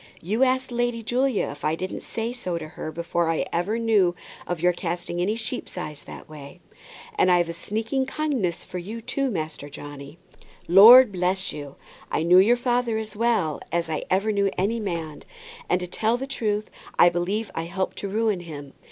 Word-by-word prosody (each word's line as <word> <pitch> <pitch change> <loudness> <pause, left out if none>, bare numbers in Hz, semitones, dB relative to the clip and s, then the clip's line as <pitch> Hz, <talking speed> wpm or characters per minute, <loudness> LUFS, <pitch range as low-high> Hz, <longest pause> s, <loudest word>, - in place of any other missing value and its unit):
You 215 +9 0
ask 260 0 +1
Lady 240 -1 -1
Julia 250 0 +1
if 145 0 -12
I 155 +1 +1
didn't 185 +3 -5
say 230 +1 -4
so 185 -9 -3
to 155 -2 -7
her 155 - -6
before 170 +1 -1
I 165 - 0
ever 190 +6 0
knew 210 -6 +3 0.3
of 175 -2 -2
your 180 +2 +3
casting 175 0 -4
a 195 +5 +1
sheep's 230 -2 -5
eye 155 -4 -4
that - - -10
way. 150 -2 -11 0.5
And 185 - +3
I've 175 -1 +3
a - - -3
sneaking 225 +9 -2
kindness 270 - -2
for 180 - -6
you 210 +6 -6
too, 275 +3 -1
Master 155 - -4
Johnny. 145 +1 -10 0.5
Lord 225 +7 +9
bless 185 +1 -1
you, 145 -2 -8 0.3
I 155 - 0
knew 180 +2 +7
your 230 +6 +5
father 240 -2 0
as 220 -2 -6
well 210 -10 +1
as 170 -1 -1
I 155 - -2
ever 200 +4 +2
knew 200 -1 +2
any 210 +5 0
man; 170 -7 -4 0.5
and - - +2
to - - -2
tell 220 +6 0
the 265 - -4
truth, 215 -6 -2 0.3
I 175 - +7
believe 190 +6 -2
I 165 - -3
helped 185 +2 -3
to 200 - -4
ruin 215 -1 0
him. 145 -5 -9
190 Hz, 190 wpm, -24 LUFS, 170-230 Hz, 0.5 s, Lord